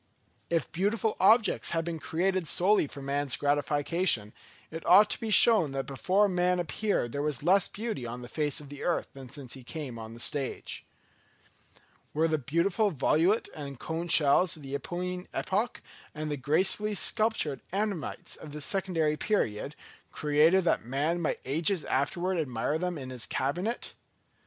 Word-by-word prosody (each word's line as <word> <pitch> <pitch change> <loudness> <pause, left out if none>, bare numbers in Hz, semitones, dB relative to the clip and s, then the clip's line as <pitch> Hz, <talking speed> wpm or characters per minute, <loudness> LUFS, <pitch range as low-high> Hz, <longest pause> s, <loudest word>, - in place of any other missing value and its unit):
If 165 -3 -1
beautiful 210 +5 0
objects 220 +3 +4
had 165 -1 -1
been 170 -1 -4
created 185 +2 -1
solely 190 0 +3
for 140 0 -9
man's 140 -1 0
gratification, 145 - +1 0.4
it 165 +1 -7
ought 205 +4 +6
to - - -2
be 225 - -4
shown 210 -9 +6
that 135 0 -2
before 185 +10 +1
man 180 -1 +1
appeared 175 - -1
there 140 - -3
was 145 -3 -2
less 190 +3 +4
beauty 215 - -5
on 120 +1 -7
the - - -8
face 150 +3 -1
of 145 -2 -11
the 145 0 -9
earth 175 - -1
than 135 -2 -11
since 130 -2 -7
he 130 - -9
came 130 -3 -7
on 110 0 -9
the - - -12
stage. 135 +2 -3 1.3
Were 160 +2 +3
the 155 -1 0
beautiful 170 - +1
volute 170 - +2
and 140 -4 -8
cone 165 +2 -4
shells 155 +2 +4
of 150 - -13
the 135 0 -7
Eocene 180 +4 -4
epoch, 210 +5 -1 0.3
and 155 0 -4
the - - 0
gracefully 190 +9 +1
sculptured 210 -9 +1
ammonites 195 -5 -3
of 150 -2 -11
the 150 - -6
Secondary 165 -4 0
period, 145 - -1 0.4
created 155 +5 +3
that 170 - +1
man 145 +8 -1
might 160 - -2
ages 160 +6 0
afterwards 175 +6 0
admire 140 +2 -2
them 180 -1 -2
in 130 -2 -7
his 125 -2 -5
cabinet? 180 - -2
160 Hz, 165 wpm, -29 LUFS, 140-185 Hz, 1.3 s, ought